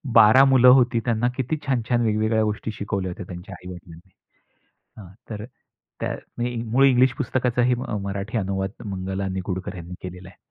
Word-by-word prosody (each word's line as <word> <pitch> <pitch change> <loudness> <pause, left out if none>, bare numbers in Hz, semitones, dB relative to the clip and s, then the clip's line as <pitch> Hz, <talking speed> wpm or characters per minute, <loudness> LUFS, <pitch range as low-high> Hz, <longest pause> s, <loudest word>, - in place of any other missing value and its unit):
12 115 +4 +8
मुलं 130 -2 +5
होती. 125 -2 +6
त्यांना 120 0 +1
किती 130 +4 -1
छान-छान 120 -2 +1
वेगवेगळ्या 110 0 +1
गोष्टी 105 +1 -2
शिकवल्या 100 -3 -3
होत्या 90 - -7
त्यांच्या 90 +2 -9
आई 90 - -13
वडिलांनी. 90 +1 -13 0.9
हां, 100 - -11 0.2
तर 105 -1 -5 0.6
त्या - - -2 0.5
मूळ 135 +4 +4
इंग्लिश 130 -1 +4
पुस्तकाचाही 125 -1 +1 0.3
मराठी 100 +3 -3
अनुवाद 95 -1 -2 0.2
मंगला 95 0 -3
निगुडकर 95 +1 -4
यांनी 85 +1 -8
केलेला 90 0 -8
आहे. 95 - -17
105 Hz, 150 wpm, -23 LUFS, 95-120 Hz, 0.9 s, 12